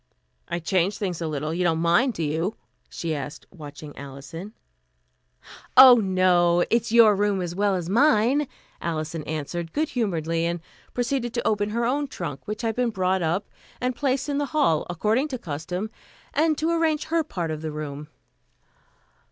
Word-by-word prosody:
"I 170 - -2
changed 185 +3 0
things 180 -5 -3
a 165 - -1
little. 155 +1 -3
You 180 +2 0
don't 165 -2 +2
mind, 175 +9 +3
do 165 - -2
you?" 160 +7 -1 0.3
she 165 -2 -3
asked, 145 -1 -6
watching 150 -3 -10
Alison. 140 +8 -9 1.2
"Oh, 260 -1 +11
no, 180 -4 +3
it's 230 -1 +1
your 225 -3 +7
room 205 -1 +1
as 175 -2 -3
well 200 +1 +1
as 175 -2 -3
mine," 250 - +3 0.3
Alison 160 -1 -3
answered 160 +2 -4
good 310 +1 0
humoredly, 165 - -1
and 170 0 -2 0.4
proceeded 245 -1 -1
to 235 - 0
open 205 -1 +1
her 235 +2 -1
own 285 +4 0
trunk, 170 - -6
which 210 +3 -4
had 225 -1 0
been 245 -1 +1
brought 190 -3 0
up 175 +5 0 0.3
and 250 0 -1
placed 270 0 0
in 285 -1 -1
the 290 - -1
hall, 165 - +2
according 215 - +1
to 265 -4 -4
custom, 180 +3 -5 0.4
and 315 -1 +2
to 320 +2 0
arrange 325 -2 +1
her 330 0 0
part 175 - -4
of 155 -1 -4
the 160 -1 -4
room. 150 -1 -6
190 Hz, 170 wpm, -25 LUFS, 165-240 Hz, 1.2 s, Oh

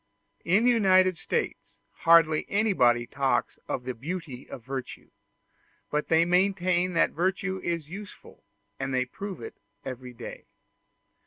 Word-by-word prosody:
In 195 +6 +3
the 250 - +6
United 185 -5 +4
States - - -3
hardly 165 -2 +4
anybody 125 - +3
talks 135 +2 -1
of 125 - -3
the 130 +1 -3
beauty 140 0 -6
of 115 - -9
virtue; 135 -1 -6 0.8
but 150 0 -1
they 165 +1 +4
maintain 180 0 +2
that 165 - +3
virtue 190 +2 -1
is 165 -3 -2
useful, 195 +4 -11 0.4
and 135 -1 -2 0.2
prove 195 -2 -6
it - - -8 0.3
every 125 -1 -7
day. 120 -1 -9
170 Hz, 130 wpm, -27 LUFS, 135-185 Hz, 0.8 s, the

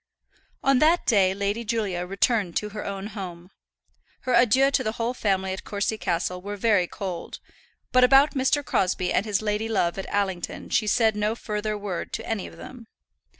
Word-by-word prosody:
On 270 -1 +4
that 325 +4 +3
day 195 -5 +4
Lady 200 +3 -2
Julia 205 -6 -2
returned 195 -1 +1
to 210 - -2
her 210 0 -6
own 195 0 -5
home. 180 -2 -8 0.7
Her 255 - -1
adieux 255 +3 +5
to 270 - +1
the 220 -2 -2
whole 230 +2 -2
family 190 -5 0
at 190 - -7
Courcy 205 +1 -2
Castle 180 0 -2
were 205 +2 -6
very 200 -4 +2
cold, 185 -4 -6 0.5
but 255 0 +5
about 270 +3 +6
Mr. 275 +1 +1
Crosbie 185 -3 0
and 200 - +1
his 210 0 0
lady 215 +1 -1
love 185 -4 0
at 195 - -6
Allington 190 -4 -2
she 215 - +1
said 220 -1 +3
no 210 +1 0
further 210 -1 -3
word 200 -4 -5
to - - -4
any 220 -4 -2
of - - -13
them. 240 -3 -11
210 Hz, 185 wpm, -25 LUFS, 190-230 Hz, 0.7 s, about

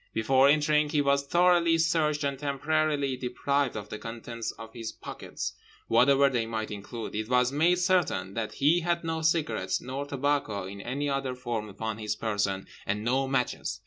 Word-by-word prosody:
Before 130 +5 +4
entering 150 0 +3
he 150 -1 +1
was 140 0 +2
thoroughly 175 0 +4
searched 155 -2 +1
and 140 -1 -1
temporarily 145 -1 0
deprived 130 +2 -1
of 105 -1 -6
the 105 - -6
contents 115 0 -6
of 115 0 -11
his 115 -2 -5
pockets, - - -6 0.3
whatever 135 +4 +5
they 120 -4 0
might 110 -1 -3
include. 105 +3 -6
It 110 +1 -3
was 125 0 +3
made 165 +5 +3
certain 175 - +1
that 110 -1 -3
he 155 +5 +3
had 170 0 -1
no 160 0 -2
cigarettes 130 - +1
nor 135 +3 -5
tobacco 140 -8 -1
in 100 +1 -8
any 140 +6 -2
other 135 -2 -1
form 120 -4 -4
upon 110 +2 -5
his 105 -1 -2
person, 100 -3 -1 0.2
and 105 +2 -1
no 130 +3 +1
matches. 125 -5 -1
135 Hz, 175 wpm, -28 LUFS, 110-150 Hz, 0.3 s, whatever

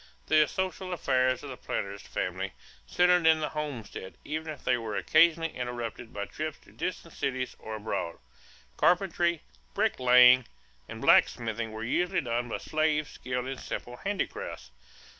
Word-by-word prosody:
The 155 -1 +5
social 185 +1 -3
affairs 130 -5 +1
of 140 - -6
the 130 - -7
planter's 100 0 -4
family - - -3 0.3
centered 180 - +4
in 160 0 +6
the 150 - -1
homestead 140 -11 -6
even 155 +1 -3
if 150 - -10
they - - +3
were 115 -3 -4
occasionally 165 +3 +3
interrupted 120 -1 -5
by 100 0 -4
trips 155 +5 -5
to - - -19
distant 170 -2 -5
cities 130 -2 -2
or 110 - -6
abroad. 105 -6 -3 0.6
Carpentry, 175 -2 +2 0.3
bricklaying, 125 0 +6 0.4
and - - -7
blacksmithing 115 -1 +3
were 110 +1 -6
usually 175 +10 +1
done 120 -1 -2
by - - -2
slaves 155 -2 0
skilled 125 0 -4
in 135 0 -5
simple 125 0 -6
handicrafts. 200 - -4
130 Hz, 145 wpm, -29 LUFS, 120-160 Hz, 0.6 s, in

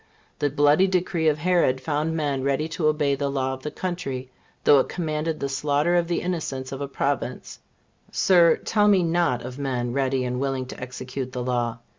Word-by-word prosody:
The 145 - +1
bloody 145 +6 +4
decree 180 -3 0
of 150 -1 +3
Herod 165 -5 +2
found 150 +4 -1
men 145 -3 -1
ready 140 +3 0
to 160 -1 -1
obey 150 -2 +2
the 140 0 -1
law 130 -1 -1
of 130 - -8
the 150 - -4
country, 135 -8 -4 0.3
though 145 - +6
it - - 0
commanded 155 -2 -2
the 140 - -1
slaughter 145 +5 +1
of 170 -1 +2
the 170 - -1
innocents 145 -7 -3
of 135 0 -5
a 140 - -2
province, 140 -2 -3 0.5
Sir, 175 -3 +5
tell 210 -1 +1
me 195 -3 +5
not 170 -6 +1
of 125 +2 -7
men 125 -3 -2
ready 135 -1 0
and 125 0 -2
willing 135 -1 -1
to 125 - -9
execute 130 0 -6
the 125 - -3
law! 120 -2 -1
140 Hz, 195 wpm, -24 LUFS, 130-165 Hz, 0.5 s, though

